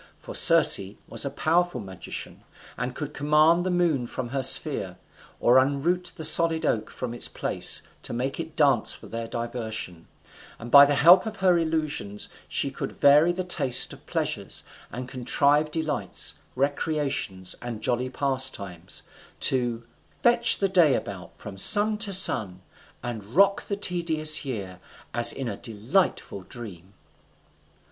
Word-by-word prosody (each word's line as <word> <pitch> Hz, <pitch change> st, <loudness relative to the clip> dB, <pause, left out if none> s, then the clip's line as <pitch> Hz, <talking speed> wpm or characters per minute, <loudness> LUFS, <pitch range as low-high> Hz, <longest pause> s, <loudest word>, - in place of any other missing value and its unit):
For -, -, -11 dB
Circe -, -, +7 dB, 0.3 s
was 115 Hz, +1 st, 0 dB
a -, -, -2 dB
powerful 165 Hz, +1 st, -1 dB
magician, 95 Hz, -4 st, -9 dB, 0.3 s
and 125 Hz, +1 st, -5 dB
could 150 Hz, -1 st, -7 dB
command 155 Hz, +4 st, +2 dB
the 185 Hz, -, -3 dB
moon 170 Hz, -8 st, 0 dB
from 125 Hz, -1 st, -6 dB
her 135 Hz, +2 st, -3 dB
sphere, -, -, +2 dB, 0.4 s
or 125 Hz, +2 st, +4 dB
unroot 165 Hz, +7 st, -1 dB
the 160 Hz, -4 st, -4 dB
solid 160 Hz, +1 st, +3 dB
oak 110 Hz, -1 st, -2 dB
from 125 Hz, -2 st, -7 dB
its 120 Hz, -, +1 dB
place -, -, 0 dB, 0.2 s
to -, -, -7 dB
make 130 Hz, +5 st, -4 dB
it 160 Hz, -1 st, -7 dB
dance 140 Hz, -8 st, +2 dB
for -, -, -14 dB
their 115 Hz, 0 st, -6 dB
diversion, 110 Hz, -8 st, -7 dB, 0.5 s
and 120 Hz, +1 st, -10 dB
by 140 Hz, 0 st, +8 dB
the 145 Hz, -, +1 dB
help 175 Hz, +8 st, +5 dB
of 220 Hz, -, -6 dB
her 185 Hz, -3 st, +2 dB
illusions 155 Hz, -11 st, -4 dB, 0.2 s
she -, -, -3 dB
could -, -, -7 dB
vary 150 Hz, +4 st, +4 dB
the 185 Hz, +1 st, -4 dB
taste 140 Hz, -8 st, +2 dB
of -, -, -17 dB
pleasures, -, -, -4 dB, 0.3 s
and 125 Hz, +1 st, -7 dB
contrive 140 Hz, +4 st, +1 dB
delights, 155 Hz, -1 st, -2 dB, 0.2 s
recreations, 140 Hz, -, -2 dB
and 120 Hz, -3 st, -7 dB
jolly 125 Hz, +1 st, 0 dB
pastimes, 130 Hz, -10 st, -4 dB, 0.4 s
to 120 Hz, -3 st, -1 dB, 0.4 s
"fetch 240 Hz, 0 st, +3 dB
the 195 Hz, -, 0 dB
day 175 Hz, -7 st, +3 dB
about 95 Hz, -2 st, -7 dB
from 100 Hz, -2 st, -11 dB
sun 210 Hz, -, +3 dB
to 215 Hz, -2 st, 0 dB
sun, 110 Hz, -, +4 dB, 0.4 s
and 120 Hz, -4 st, -6 dB
rock 200 Hz, +2 st, +3 dB
the 200 Hz, -, -3 dB
tedious 165 Hz, -5 st, +3 dB
year 100 Hz, -8 st, -7 dB, 0.3 s
as 120 Hz, 0 st, +2 dB
in 135 Hz, -, -6 dB
a 100 Hz, -4 st, -5 dB
delightful 115 Hz, -, -2 dB
dream." 95 Hz, -4 st, -11 dB
135 Hz, 150 wpm, -24 LUFS, 115-165 Hz, 0.5 s, by